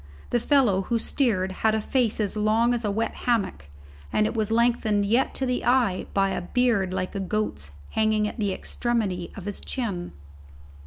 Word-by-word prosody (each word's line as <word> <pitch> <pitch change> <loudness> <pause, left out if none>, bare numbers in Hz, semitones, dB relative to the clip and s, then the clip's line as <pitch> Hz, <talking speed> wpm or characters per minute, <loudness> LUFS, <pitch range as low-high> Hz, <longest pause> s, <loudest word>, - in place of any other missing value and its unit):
The 240 - +3
fellow 240 -7 +3
who 230 +5 0
steered 215 -6 0
had 220 0 +3
a - - +1
face 230 0 0
as 210 -1 0
long 220 +3 +2
as 240 -1 -2
a 210 - 0
wet 220 +3 -1 0.2
hammock, 195 - 0 0.5
and 215 - +2
it - - -1
was 220 -2 -1
lengthened 225 -3 +2
yet 235 +6 +1
to 265 - 0
the 250 -1 -1
eye 240 -7 +2
by 195 -1 +3
a - - -2
beard 205 -2 +1
like 185 0 -3
a 200 - -3
goat's 195 - -2 0.2
hanging 215 -1 +2
at 220 - -7
the 205 -2 0
extremity 200 -4 -2
of 195 - -8
his 205 -1 -4
chin. 200 -9 -4
215 Hz, 190 wpm, -25 LUFS, 195-235 Hz, 0.5 s, The